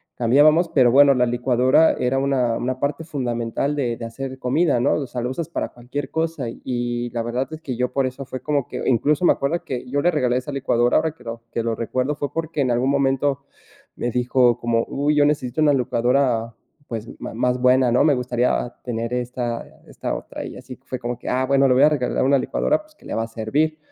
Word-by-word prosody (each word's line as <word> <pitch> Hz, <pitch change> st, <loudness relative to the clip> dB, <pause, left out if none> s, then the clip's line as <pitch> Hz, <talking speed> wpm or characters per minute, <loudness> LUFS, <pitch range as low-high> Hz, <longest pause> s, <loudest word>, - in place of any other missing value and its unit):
cambiábamos, 150 Hz, +8 st, +4 dB
pero 125 Hz, -5 st, +4 dB
bueno, 140 Hz, 0 st, +7 dB
la 125 Hz, 0 st, +3 dB
licuadora 125 Hz, +5 st, +3 dB
era 130 Hz, +2 st, +1 dB
una 130 Hz, -4 st, +1 dB
una 130 Hz, +1 st, -3 dB
parte 145 Hz, +4 st, -2 dB
fundamental 125 Hz, -1 st, -2 dB
de 120 Hz, -5 st, -1 dB
de 115 Hz, -, -6 dB
hacer 130 Hz, +3 st, -6 dB
comida, 140 Hz, +2 st, +2 dB
¿no?, 135 Hz, -, +3 dB
o 140 Hz, -3 st, -3 dB
sea 125 Hz, -1 st, -5 dB
la 125 Hz, -, -2 dB
usas 160 Hz, +6 st, -4 dB
para -, -, -3 dB
cualquier 130 Hz, +3 st, -6 dB
cosa, 160 Hz, -6 st, -2 dB
y 120 Hz, 0 st, -3 dB
la 120 Hz, -1 st, -2 dB
verdad 125 Hz, +3 st, -2 dB
es 155 Hz, -, -7 dB
que, 130 Hz, -5 st, -4 dB
yo 125 Hz, 0 st, -1 dB
por 135 Hz, -1 st, +1 dB
eso 130 Hz, +2 st, -6 dB
fue 130 Hz, 0 st, -6 dB
como 145 Hz, -4 st, -1 dB
que -, -, -5 dB
incluso 145 Hz, +7 st, +2 dB
me -, -, +6 dB
acuerdo 155 Hz, +5 st, -2 dB
que 125 Hz, -1 st, -5 dB
yo 145 Hz, +2 st, 0 dB
le 175 Hz, -, +3 dB
regalé 125 Hz, -5 st, +1 dB
esa 130 Hz, +3 st, -4 dB
licuadora 120 Hz, -3 st, +1 dB
ahora 160 Hz, 0 st, +1 dB
que -, -, -19 dB
lo 115 Hz, 0 st, -6 dB
que 115 Hz, -, -2 dB
lo 115 Hz, 0 st, -1 dB
recuerdo 130 Hz, +5 st, -2 dB
fue 145 Hz, -2 st, -4 dB
porque, 160 Hz, -2 st, -2 dB
en 125 Hz, -2 st, +1 dB
algún 125 Hz, +3 st, +1 dB
momento 140 Hz, 0 st, +1 dB, 0.6 s
me 120 Hz, -, -1 dB
dijo: 125 Hz, 0 st, +2 dB
como: 115 Hz, -1 st, 0 dB
"Uy, 145 Hz, +2 st, 0 dB
yo 145 Hz, -1 st, +4 dB
necesito 145 Hz, -1 st, 0 dB
una 145 Hz, -2 st, +5 dB
licuadora, 120 Hz, -2 st, +1 dB, 0.3 s
pues, 115 Hz, -1 st, -6 dB
ma -, -, -6 dB
más 125 Hz, +2 st, 0 dB
buena, 125 Hz, -1 st, +4 dB
¿no?, 125 Hz, -, +4 dB
me 150 Hz, -3 st, +4 dB
gustaría 125 Hz, -1 st, 0 dB
tener 115 Hz, -1 st, -3 dB
esta 125 Hz, -1 st, -3 dB, 0.2 s
esta -, -, -4 dB
otra", -, -, -7 dB
y -, -, -8 dB
así 125 Hz, -, -10 dB
fue 130 Hz, -, -5 dB
como 120 Hz, 0 st, -4 dB
que: -, -, -11 dB
"Ah, 130 Hz, +1 st, +1 dB
bueno, 140 Hz, 0 st, +4 dB
le 125 Hz, -, +4 dB
voy 135 Hz, -, +5 dB
a 150 Hz, -, +7 dB
regalar 140 Hz, -5 st, 0 dB
una 140 Hz, 0 st, +4 dB
licuadora 305 Hz, -, 0 dB
pues, 305 Hz, 0 st, -24 dB
que -, -, -21 dB
le -, -, -4 dB
va 115 Hz, -, 0 dB
a -, -, -5 dB
servir", 140 Hz, +8 st, -1 dB
130 Hz, 230 wpm, -22 LUFS, 120-145 Hz, 0.6 s, bueno